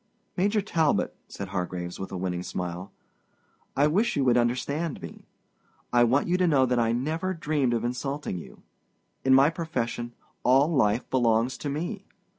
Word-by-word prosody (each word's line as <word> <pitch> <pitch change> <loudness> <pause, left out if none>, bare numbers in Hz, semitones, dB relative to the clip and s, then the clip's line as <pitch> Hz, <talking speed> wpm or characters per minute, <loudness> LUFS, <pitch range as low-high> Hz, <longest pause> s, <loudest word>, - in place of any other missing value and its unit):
"Major 205 +3 +2
Talbot," 160 -7 +1
said 100 -1 -7
Hargraves, 90 -2 -4
with 95 - -6
a 95 - -4
winning 90 -1 -2
smile, 90 0 -5 0.9
"I 140 - +5
wish 190 +10 +2
you 140 -3 +1
would 125 - +4
understand 130 +6 0
me. - - -10 0.7
I 120 0 +6
want 130 +5 +2
you 180 +1 +2
to 180 -1 +2
know 140 -5 +4
that 125 -1 +1
I 115 -1 +2
never 160 +10 -1
dreamed 145 -6 0
of 115 - -2
insulting 125 -3 -3
you. - - -13 0.6
In 130 0 +5
my 140 +4 +6
profession, 120 -8 -3 0.3
all 135 +6 +4
life 110 -4 +2
belongs 120 0 +2
to 145 - -3
me. 175 +8 -4
130 Hz, 165 wpm, -27 LUFS, 115-155 Hz, 0.9 s, I